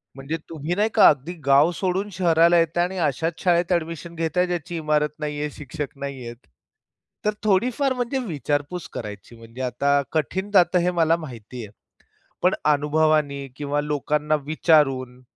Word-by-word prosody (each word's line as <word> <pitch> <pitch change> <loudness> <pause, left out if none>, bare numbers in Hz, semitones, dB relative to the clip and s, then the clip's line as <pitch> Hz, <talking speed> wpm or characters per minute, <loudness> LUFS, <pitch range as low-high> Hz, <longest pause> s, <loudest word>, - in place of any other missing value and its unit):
म्हणजे 140 +4 -4
तुम्ही 160 +2 -3
नाही 210 +3 +2
का - - +7
अगदी 145 +4 -1
गाव 140 +4 +5
सोडून 190 +3 -1
शहराला 170 -1 +4
येताय 165 +1 +1
आणि 190 +1 -5
अशाच 160 +5 -3
शाळेत 175 0 +2
ऍडमिशन 165 0 -3
घेताय 165 +2 0
ज्याची 175 0 -4
इमारत 150 -1 +1
नाहीये, 150 0 -3
शिक्षक 140 0 -7
नाहीयेत. 130 -4 -6 0.9
तर 210 - +2
थोडी-फार 250 +7 +2
म्हणजे 250 +2 -2
विचारपूस 150 +1 -3
करायची. 105 +1 -8
म्हणजे 115 +3 -11
आता 140 +3 +1
कठीण 185 +6 -2
जातं 180 -2 +4
हे 180 +1 +1
मला 165 -1 +3
माहिती 125 -5 -9
आहे. 100 - -14 0.7
पण 180 - +4
अनुभवाने 150 -1 +2
किंवा 145 0 -1
लोकांना 150 +1 0
विचारून 135 -5 +2
155 Hz, 145 wpm, -23 LUFS, 140-175 Hz, 0.9 s, का